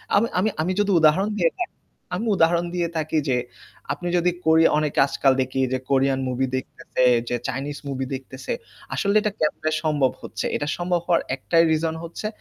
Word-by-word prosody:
আমি 210 +3 +4
আমি 215 - +2
আমি 175 +4 0
যদি 205 -1 +2
উদাহরণ 160 +6 +4
দিয়ে 165 -1 +3
থাকি 360 - -4 0.4
আমি 220 +6 -3
উদাহরণ 170 0 +3
দিয়ে 170 -2 0
থাকি 155 0 -1
যে 125 - +2 0.6
আপনি 175 - -6
যদি 175 +1 +2
কোরিয়া 160 0 +5
অনেকে 150 -1 0
আজকাল 135 0 +2
দেখি 130 +1 -2
যে - - +2
কোরিয়ান 135 0 +2
মুভি 130 +1 0
দেখতেছে, 130 0 -3 0.3
যে 125 - 0
চাইনিজ 140 +3 -4
মুভি 135 -1 -3
দেখতেছে 130 0 -5 0.4
আসলে 200 +1 0
এটা 210 - 0
কেমনে 155 0 0
সম্ভব 145 -4 +2
হচ্ছে? - - -5
এটা 145 - -2
সম্ভব 175 0 0
হওয়ার 170 -1 +3
একটাই 165 +5 +3
রিজন 160 0 0
হচ্ছে 170 +5 -5
155 Hz, 180 wpm, -23 LUFS, 135-175 Hz, 0.6 s, কোরিয়া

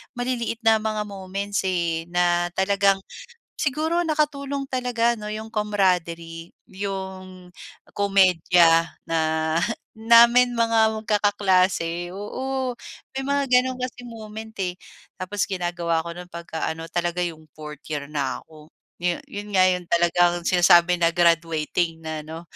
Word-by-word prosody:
maliliit 245 -2 -2
na 225 -1 +5
mga 215 -1 -3
moments, 200 0 -4
eh, 170 -3 -1
na 175 0 +1
talagang 195 +1 +2 0.6
siguro 315 +5 0
nakatulong 285 -3 -1
talaga 245 -3 0
ano 210 -2 -7
'yong 220 +1 -7
camaraderie, 175 -5 -1 0.2
'yong 190 -2 -7 0.4
komedya 180 -4 +4 0.2
na 165 0 0 0.8
namin 235 +2 +6
mga 225 -1 +3
magkakaklase, 190 -5 +1
oo. 255 +6 -4 0.4
May 270 - -3
mga 280 +1 0
gano'n 255 0 +2
kasi 250 -1 -5
moment, 220 -2 -9
eh, 180 -2 -2 0.4
tapos 195 +2 -3
ginagawa 175 -3 -1
ko 170 - -7
no'n 180 +1 -8
'pagka 170 -2 -5
ano 165 0 -5
talaga 175 +1 -1
'yong 160 -3 -5
fourth 150 -1 -9
year 150 -1 -5
na 135 -4 -2
ako, 155 -1 -16 0.3
'yon 175 0 -1
'yon 205 +1 -6
nga 185 - +5
'yon 180 -1 -2
talagang 175 0 +2
sinasabi 175 0 +5
na 170 -1 +2
graduating 165 -1 +1
na 155 -1 -5
'no. 160 +2 -8
185 Hz, 130 wpm, -23 LUFS, 170-220 Hz, 0.8 s, namin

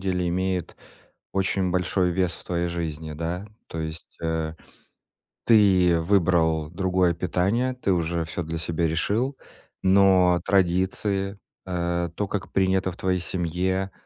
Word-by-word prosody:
деле 90 -2 -1
имеет 95 0 -2 0.6
очень 95 -1 0
большой 90 0 +1
вес 90 -1 0
в - - -10
твоей 85 -1 -1
жизни, 80 -2 -4
да? 85 +5 -4 0.2
То 85 - -6
есть, 80 +1 -7
э, 80 -1 -2 0.9
ты 95 -6 +5
выбрал 80 -4 +2
другое 90 -1 +1
питание, 95 +9 0
ты 125 -6 -1
уже 85 -1 0
всё 80 +2 -4
для 80 +1 -4
себя 85 0 0
решил. 110 - 0 0.5
Но 95 -2 +5
традиции, 95 +1 +1 0.3
э, 85 -1 -1
то, 105 - -2
как 100 -1 -4
принято 95 -1 +2
в 90 - -13
твоей 95 -1 0
семье, 95 +2 -1
90 Hz, 130 wpm, -25 LUFS, 85-95 Hz, 0.9 s, ты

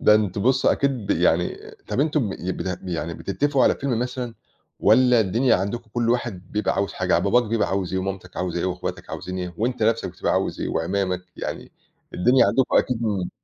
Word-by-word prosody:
ده 105 - +6
أنتم 100 -2 +1
بُصّ، 130 +2 +2
أكيد 140 - +3 0.2
ب - - -3
يعني - - +2 0.3
طَب - - 0
أنتم 150 -6 +1
ب - - -4 0.2
بت 90 -1 -3
يعني 85 -2 -3
بتتفقوا 140 +6 0
على - - +5
فيلم 135 -4 -1
مثلًا، 125 -1 -3 0.5
والّا 125 +1 +5
الدنيا 115 +4 +3
عندكم 110 +5 -4
كُل 120 -1 +1
واحد 110 -7 -2
بيبقى 105 -1 0
عاوز 100 0 -1
حاجة، 90 0 -1
يعني 85 - +3
باباك 120 +5 +4
بيبقى 115 0 0
عاوز 95 -2 -2
إيه 95 - 0
ومامتك 95 -1 -5
عاوزة 90 -1 -2
إيه - - 0
وأخواتك 90 -1 -4
عاوزين 90 0 -5
إيه، 90 -1 -5
وأنت 120 +1 -1
نفسك 115 +1 +2
بتبقى - - -2
عاوز - - -1
إيه؟ - - -2
واعمامك 90 +2 -1
يعني، - - -6 0.4
الدنيا 125 +8 +4
عندكم 130 -1 +2
أكيد 120 -2 0
م 100 -5 -1
105 Hz, 200 wpm, -23 LUFS, 90-125 Hz, 0.5 s, ده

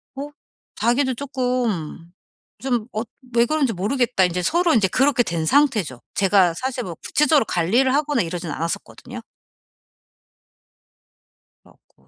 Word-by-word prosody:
어 280 +2 -6 0.5
자기도 260 +3 +1
조금 245 - -3 0.5
좀 245 -4 -1
"엇 220 +2 -4 0.3
왜 235 0 +5
그런지 280 -2 0
모르겠다." 215 +1 +1
인제 180 0 -2
서로 345 - +2
인제 210 -5 +3
그렇게 265 +1 +2
된 165 -6 -2
상태죠. 210 - +2
제가 190 -3 +3
사실 255 -1 -3
뭐 175 -3 -6
구체적으로 300 - +2
관리를 235 +11 +1
하거나 290 -4 +1
이러진 170 0 -5
않았었거든요. 165 +3 -5 2.4
그래 - - -21
갖고. 65 - -31
235 Hz, 290 characters per minute, -22 LUFS, 180-270 Hz, 2.4 s, 왜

